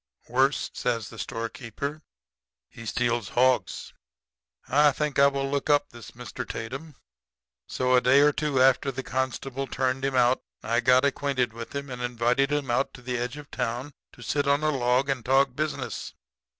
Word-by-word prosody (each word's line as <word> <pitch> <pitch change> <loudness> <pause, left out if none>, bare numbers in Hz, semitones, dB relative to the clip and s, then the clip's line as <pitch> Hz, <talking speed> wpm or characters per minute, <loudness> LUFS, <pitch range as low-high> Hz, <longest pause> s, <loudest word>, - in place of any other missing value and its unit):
"'Worse,' 135 +4 +1
says 115 -3 -2
the 115 - -11
storekeeper. 120 +5 -5 0.7
'He 115 -1 -10
steals 120 -2 0
hogs.' 125 -5 +1 0.7
"I 145 +2 +5
think 150 0 -1
I 140 - +8
will 140 0 -1
look 140 +1 -2
up 145 0 +3
this 120 -1 -11
Mr. 120 0 -6
Tatum; 135 +7 -6 0.7
so 130 0 0
a 125 - +6
day 130 +3 +5
or 150 +1 +6
two 145 -2 -1
after 135 +1 +4
the 135 +1 -5
constable 130 +1 -3
turned 130 0 -1
him 135 -1 0
out 125 0 +3 0.2
I 115 - +1
got 125 +2 +4
acquainted 135 -4 0
with 115 +4 -8
him 140 -1 -4
and 125 0 -6
invited 125 +3 +1
him 145 -4 -1
out 135 +3 0
on 125 - -15
the 125 -1 -2
edge 125 +3 -3
of 145 -1 -11
town 125 +4 -3 0.2
to 120 - -13
sit 145 +4 0
on 140 +2 +2
a 155 - +3
log 125 0 +1
and 135 -3 -1
talk 135 +1 +3
business. 155 +1 -4
130 Hz, 175 wpm, -26 LUFS, 120-140 Hz, 0.7 s, I